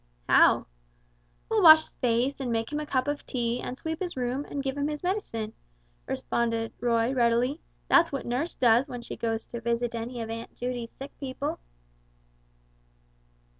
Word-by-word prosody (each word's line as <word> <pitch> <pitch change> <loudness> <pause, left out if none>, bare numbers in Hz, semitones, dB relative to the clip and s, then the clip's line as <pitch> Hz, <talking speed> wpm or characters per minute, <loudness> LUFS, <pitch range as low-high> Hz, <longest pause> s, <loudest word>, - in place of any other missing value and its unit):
"How?" - - +5 0.8
"We'll 445 -1 +2
wash 315 -3 +10
his - - -12
face, 245 +3 +1
and 255 -3 -2
make 225 +2 -1
him 295 - 0
a 300 - -5
cup 260 -2 0
of 290 0 -2
tea, 240 -2 -2
and 255 - -5
sweep 320 +2 -4
his 355 -6 -4
room, 255 +3 -1
and 280 -1 -4
give 270 0 -2
him 285 0 -1
his 300 +1 -4
medicine," 230 - -2 0.5
responded 230 -1 -1
Roy, 235 +1 +1
readily; 245 +4 +2 0.3
"that's 335 -1 +5
what 275 - -4
nurse 255 +8 -2
does 240 +2 +4
when 245 -3 -7
she - - -6
goes 225 -1 -2
to 235 - -7
visit 235 +1 -1
any 235 +1 -4
of 225 - -6
Aunt 230 +1 -7
Judy's 245 -1 -4
sick 275 +1 -9
people." 260 -2 -4
250 Hz, 170 wpm, -28 LUFS, 235-285 Hz, 0.8 s, wash